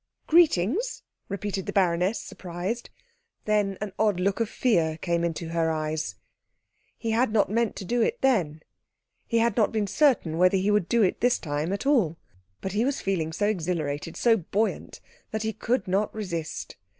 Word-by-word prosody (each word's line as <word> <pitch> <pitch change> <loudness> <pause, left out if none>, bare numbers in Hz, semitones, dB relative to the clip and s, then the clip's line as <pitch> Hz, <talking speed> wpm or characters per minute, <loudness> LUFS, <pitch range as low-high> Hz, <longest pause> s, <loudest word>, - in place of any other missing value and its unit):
"Greetings?" 330 - +3 0.3
repeated 200 -1 -3
the - - -1
baroness, 185 +2 +2
surprised. 185 +6 -5 0.6
Then 205 -2 +1
an 210 -2 -4
odd 210 -4 +2
look 195 +3 0
of 230 -2 0
fear 165 -13 +1
came 170 0 -1
into 165 0 -2
her 165 -1 +1
eyes. 155 0 -2 0.8
He 225 - -2
had 230 +1 +2
not 210 -2 +2
meant 230 0 +1
to 195 - -6
do 240 +5 0
it 475 - +1
then; 170 - +1 0.6
he 230 - +1
had 230 -2 +2
not 220 -3 +3
been 215 -2 0
certain 200 - +2
whether 185 +2 +5
he 195 +2 +1
would 205 -4 +1
do 235 -2 +4
it 185 - 0
this 245 +1 +3
time 150 +2 -3
at 200 +4 -3
all; 220 - +2 0.4
but 190 - -3
he 210 +4 +1
was 275 +2 0
feeling 170 -5 -1
so 205 +5 -1
exhilarated, 165 -6 -2
so 230 -2 +4
buoyant, 205 +4 -2 0.3
that 220 0 -3
he 220 0 -1
could 235 +3 -1
not 195 +3 +1
resist. 170 -7 -5
200 Hz, 175 wpm, -26 LUFS, 170-225 Hz, 0.8 s, whether